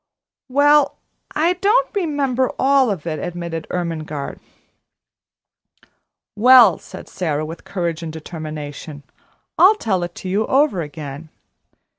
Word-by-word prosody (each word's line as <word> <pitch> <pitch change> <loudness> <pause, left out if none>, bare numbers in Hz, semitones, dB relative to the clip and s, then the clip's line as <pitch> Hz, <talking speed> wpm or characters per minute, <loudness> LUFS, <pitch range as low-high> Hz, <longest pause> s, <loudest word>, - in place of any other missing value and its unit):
"Well, 290 +2 +4 0.4
I 335 +4 +2
don't 415 +8 +1
remember 285 - 0
all 270 -2 +3
of 185 -7 -3
it," 155 -3 -3
admitted 170 -2 -5
Ermengarde. 155 -5 -4 2.0
"Well," 235 -4 +7
said - - -11
Sara, 155 -4 -2
with 165 +2 -9
courage 170 -3 -3
and 165 -2 -5
determination, 155 -2 -8 0.6
"I'll 390 +4 +7
tell 195 - -1
it 175 0 -5
to - - -8
you 200 +4 0
over 270 - +2
again." 150 0 -8
180 Hz, 115 wpm, -20 LUFS, -, 2.0 s, Well